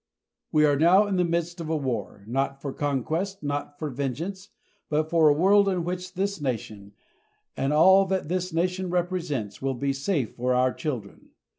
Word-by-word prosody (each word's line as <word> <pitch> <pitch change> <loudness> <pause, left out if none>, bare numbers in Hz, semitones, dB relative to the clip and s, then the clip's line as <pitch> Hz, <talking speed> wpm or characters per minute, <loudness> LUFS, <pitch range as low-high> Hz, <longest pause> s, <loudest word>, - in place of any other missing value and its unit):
We 150 0 +4
are 145 -2 +2
now 185 +6 +6
in 200 -2 -1
the 180 - +3
midst 170 0 -2
of 160 - -5
a 160 - +1
war, 115 -7 -4
not 135 +4 -2
for 140 -1 -5
conquest, 160 +8 -2
not 145 0 -3
for 150 -2 -4
vengeance, 165 +10 -4 0.4
but 155 +1 0
for 165 -2 +5
a - - +5
world 200 +5 +4
in 180 -3 -1
which 180 +1 -5
this 195 -2 -2
nation, 110 -6 -4 0.6
and 135 - -1
all 190 +6 +6
that 190 -4 -1
this 180 +2 -2
nation 180 +2 -1
represents, 170 - -2
will 135 0 -1
be 140 +2 -1
safe 140 - -2
for 125 +1 0
our 125 0 +2
children. 120 -10 -6
155 Hz, 180 wpm, -26 LUFS, 135-180 Hz, 0.6 s, now